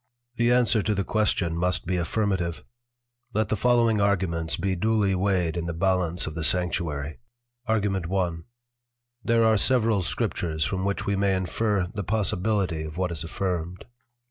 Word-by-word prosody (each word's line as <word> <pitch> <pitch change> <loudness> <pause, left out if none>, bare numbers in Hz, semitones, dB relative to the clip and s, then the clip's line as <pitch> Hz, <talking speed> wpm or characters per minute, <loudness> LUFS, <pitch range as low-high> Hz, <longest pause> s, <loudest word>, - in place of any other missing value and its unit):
_ - - -32
The 120 +1 +3
Answer 120 -3 +3
to 105 +1 0
the 100 - 0
Question 95 -6 +1
must 90 +1 0
be 90 +2 -1
Affirmative; 90 -2 -1 0.7
Let 110 -1 +1
the - - +1
following 115 -1 +3
Arguments 85 -5 0
be 95 +2 -1
duely 105 +1 +1
weighed 90 -3 +1
in 85 -1 -3
the 85 - -3
Ballance 90 -1 +1
of 80 - -5
the 80 0 -4
Sanctuary. 80 -5 0 0.5
Argu. 100 -4 +1
1. 90 -3 -1 0.8
There 115 0 +3
are 110 -1 +4
several 115 -3 +2
Scriptures 80 -3 -1
from 95 +3 -2
which 100 0 -1
we 100 - 0
may 100 0 +2
infer 95 +1 0
the 100 -2 -3
Possibility 100 -3 0
of 80 +1 -7
what 90 -1 -1
is 80 -2 -3
Affirmed. 90 0 -3
95 Hz, 165 wpm, -26 LUFS, 85-105 Hz, 0.8 s, are